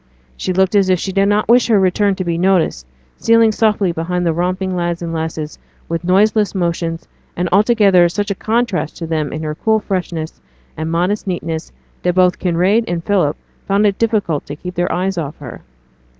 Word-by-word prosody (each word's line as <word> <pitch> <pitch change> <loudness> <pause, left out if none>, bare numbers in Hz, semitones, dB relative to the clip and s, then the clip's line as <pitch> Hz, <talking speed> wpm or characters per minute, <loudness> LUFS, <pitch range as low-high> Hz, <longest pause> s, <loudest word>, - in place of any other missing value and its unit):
She 185 - -3
looked 190 +1 +2
as 200 -2 +3
if 185 - +4
she 190 - -3
did 195 +1 +2
not 205 +1 +1
wish 240 +2 +4
her 220 -4 +4
return 195 +1 +2
to 185 - -3
be 170 -2 -1
noticed, 170 - +1 0.3
stealing 230 -1 +4
softly 210 -4 +1
behind 175 +2 -2
the 165 - +2
romping 185 +2 -1
lads 175 -1 -2
and 165 -1 -4
lasses 160 -1 -4 0.3
with 165 +1 -3
noiseless 205 +3 +2
motions, 170 -2 -2 0.3
and 180 +1 -1
altogether 200 -3 +4
such 205 +3 -2
a - - +2
contrast 220 -5 -1
to 170 - -5
them 155 -3 -2
in 155 +1 -5
her 155 -1 -3
cool 220 +7 +1
freshness 175 -5 -4 0.3
and 160 +1 -4
modest 180 +5 -1
neatness, 165 -3 -4 0.3
that 180 0 0
both 180 -1 +3
Kinraid 185 +5 +2
and 170 -1 -3
Philip 180 -8 +1 0.3
found 200 +2 +2
it 200 -2 +1
difficult 210 -10 0
to 145 - -6
keep 180 +4 -7
their 175 0 -1
eyes 185 0 -1
off 150 -1 -5
her. 135 -5 -10
180 Hz, 195 wpm, -17 LUFS, 165-200 Hz, 0.3 s, if